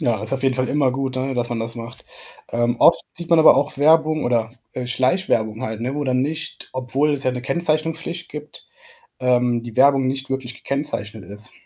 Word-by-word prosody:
Ja 115 -3 +1
das 110 +1 -4
ist - - -3
auf 135 0 +3
jeden 135 -1 +2
Fall 130 0 0
immer 140 -3 +2
gut, 130 0 -3
ne, 130 +1 -2
dass 120 -1 -1
man 120 -1 -3
das 115 0 -4
macht. 120 +2 -8 0.5
Ähm, 120 +1 0
oft - - +5
sieht 170 0 -7
man 170 - +6
aber 160 - +8
auch 140 0 0
Werbung 155 +1 +3
oder, 115 -2 +1 0.2
äh, 125 -1 -4
Schleichwerbung 125 - 0
halt, 110 -3 -4
ne, 125 +4 -2
wo 145 - -2
dann 130 -1 +1
nicht 155 +3 -4
obwohl 130 +4 0
es 145 -1 -2
ja 130 - +3
'ne 125 -1 -5
Kennzeichnungspflicht 165 +2 -2
gibt, 150 0 -10 0.5
ähm, 125 -2 +2
die 120 -2 -9
Werbung 135 0 +5
nicht 135 0 -2
wirklich 130 -2 -4
gekennzeichnet 125 -8 -4
ist. 105 +3 -9
130 Hz, 210 wpm, -21 LUFS, 120-150 Hz, 0.5 s, aber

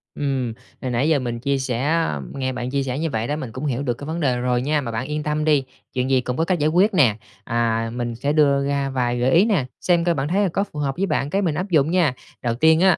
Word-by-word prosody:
Ừm, 135 -5 -1 0.3
hồi 130 - -3
nãy 125 +6 +1
giờ 155 -3 +3
mình 120 -2 -3
chia 140 +3 0
sẻ 130 +2 -1 0.4
nghe 130 -1 -2
bạn 125 0 -4
chia 140 +1 0
sẻ 130 +1 -3
như 165 - -1
vậy 115 -4 -2
đó, 145 - -1
mình 135 -7 -5
cũng 130 +6 -5
hiểu 135 -1 -1
được 125 -4 0
cái 145 - -8
vấn 160 +2 -3
đề 130 -6 +1
rồi 125 0 +1
nha, 150 +2 +1
mà 115 - -4
bạn 115 +3 -3
yên 150 +1 -3
tâm 150 0 -1
đi, 150 -3 +3 0.3
chuyện 125 0 -1
gì 130 -1 +3
cũng 125 0 -3
có 165 - +1
cách 175 0 0
giải 150 - +2
quyết 190 +6 +3
nè, 120 - +4 0.3
à, 115 0 0
mình 120 -1 -3
sẽ 140 +5 -1
đưa 140 -2 +3
ra 140 -1 0
vài 125 -2 -1
gợi 125 +2 +2
ý 175 +5 +5
nè, 195 - +1 0.2
xem 175 -2 +2
coi 170 0 +2
bạn 135 0 -1
thấy 190 +6 +1
là 190 - +2
có 195 - 0
phù 175 -7 -8
hợp 135 -2 -1
với 195 - +1
bạn, 140 -6 -1
cái 195 +6 0
mình 165 -6 0
áp 185 +4 -3
dụng 155 -3 +3
nha. 175 -7 +3 0.3
Đầu 120 -2 -1
tiên 160 +4 +4
á, 185 -1 +5
140 Hz, 290 wpm, -22 LUFS, 125-160 Hz, 0.4 s, ý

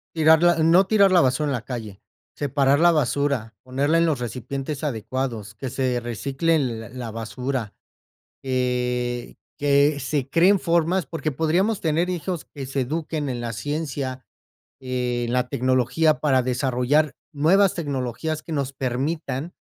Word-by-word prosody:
tirarla 160 +2 +5
no 175 +4 +5
tirar 200 -3 +5
la 175 -2 +6
basura 135 +3 +1
en - - 0
la 120 - -2
calle, 115 -5 -7 0.3
separar 140 0 +2
la 175 +1 +6
basura, 140 -5 0
ponerla 140 +5 +1
en 170 - +3
los 145 -6 0
recipientes 135 +5 -5
adecuados 115 -4 -3
que 130 +3 -5
se 130 -2 0
reciclen 135 +2 -1
la 110 - -10
la 120 -3 -6
basura. 120 0 -4 0.7
Eh, 125 -1 -1 0.2
que 145 +1 +3
se 135 0 -2
creen 180 +6 +4
formas, 170 0 +1
porque 160 +1 -3
podríamos 175 - +1
tener 165 +3 0
hijos 175 -1 -3
que 140 -2 -6
se 135 +1 -2
eduquen 155 +1 -3
en 125 -2 -3
la 120 -1 -4
ciencia, 140 0 -4 0.6
en 125 -2 -2
la 125 0 +1
tecnología 130 +4 +2
para 130 -4 +3
desarrollar 130 +4 +1 0.2
nuevas 185 +7 +4
tecnologías 145 0 -3
que 165 - -7
nos 140 -3 -2
permitan, 135 +4 -3
140 Hz, 145 wpm, -23 LUFS, 125-160 Hz, 0.7 s, la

